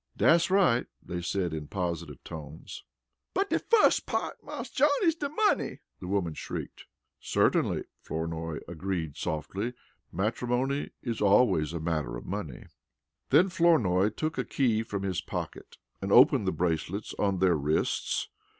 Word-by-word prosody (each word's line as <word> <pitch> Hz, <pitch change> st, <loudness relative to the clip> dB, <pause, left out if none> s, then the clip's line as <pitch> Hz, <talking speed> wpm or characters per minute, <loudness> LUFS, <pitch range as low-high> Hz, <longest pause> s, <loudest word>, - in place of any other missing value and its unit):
"Dat's 170 Hz, +2 st, +4 dB
right!" 180 Hz, -11 st, +3 dB, 0.2 s
they 90 Hz, 0 st, -4 dB
said 90 Hz, -1 st, -1 dB
in 75 Hz, -2 st, -5 dB
positive 85 Hz, -5 st, -4 dB
tones. 80 Hz, -2 st, -9 dB, 0.5 s
"But 390 Hz, +1 st, 0 dB
de -, -, +3 dB
fuss 460 Hz, -2 st, +4 dB
part, -, -, -3 dB
Marse -, -, -6 dB
John, 290 Hz, +3 st, +4 dB
is 330 Hz, -3 st, +4 dB
de 295 Hz, -3 st, -4 dB
money!" 420 Hz, +8 st, +1 dB, 0.2 s
the 90 Hz, -, -7 dB
woman 95 Hz, -4 st, 0 dB
shrieked. -, -, -6 dB, 0.3 s
"Certainly," -, -, +1 dB, 0.2 s
Flournoy 80 Hz, 0 st, -4 dB
agreed 85 Hz, -3 st, -3 dB
softly. 100 Hz, +10 st, -3 dB, 0.4 s
"Matrimony 125 Hz, +8 st, -1 dB
is 115 Hz, -3 st, -3 dB
always 100 Hz, -7 st, +4 dB
a 85 Hz, -, -3 dB
matter 75 Hz, -7 st, -2 dB
of -, -, -10 dB
money." 90 Hz, -10 st, -5 dB, 0.6 s
Then 165 Hz, +8 st, +5 dB
Flournoy 115 Hz, -, +3 dB
took 155 Hz, +9 st, -3 dB
a -, -, +1 dB
key 115 Hz, -5 st, +1 dB
from 100 Hz, -3 st, -4 dB
his 95 Hz, -3 st, -1 dB
pocket -, -, -6 dB, 0.2 s
and -, -, -3 dB
opened -, -, +6 dB
the -, -, +3 dB
bracelets 90 Hz, +4 st, -2 dB
on 100 Hz, -2 st, +1 dB
their 90 Hz, -2 st, +3 dB
wrists. 75 Hz, +1 st, 0 dB
95 Hz, 145 wpm, -29 LUFS, 80-125 Hz, 0.6 s, opened